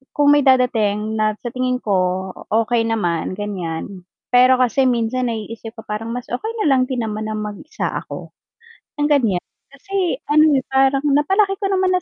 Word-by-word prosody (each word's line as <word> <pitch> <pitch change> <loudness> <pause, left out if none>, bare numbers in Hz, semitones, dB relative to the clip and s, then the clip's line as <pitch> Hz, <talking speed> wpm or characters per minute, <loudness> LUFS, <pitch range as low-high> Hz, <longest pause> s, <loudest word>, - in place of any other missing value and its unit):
kung 290 0 +4
may 290 -1 +4
dadating 220 -5 +2
na 215 0 +1
sa 240 - -4
tingin 255 0 -1
ko, 185 -1 0 0.2
okey 225 +1 +2
naman, 175 -8 -1
ganyan, 185 -2 -5 0.3
pero 255 +1 +5
kasi 255 +2 +2
minsan 245 +1 0
naiisip 225 0 -6
ko 220 - -9
parang 220 +2 -4
mas 245 +1 -5
okey 430 - -3
nalang 270 -3 +3
din 255 -1 -3
naman 215 0 -4
na 215 - -3
mag-isa 210 +8 -5 0.2
ako - - -9 0.7
ng, 295 - +2
ganyan. 230 -11 +2 0.3
Kasi 365 +3 -2 0.2
ano, 305 0 +5
eh, 260 - -1
parang 270 +1 +3
napalaki 385 +8 +3
ko 395 - +1
naman 375 -1 +2
na 365 - +1
245 Hz, 170 wpm, -20 LUFS, 215-275 Hz, 0.7 s, pero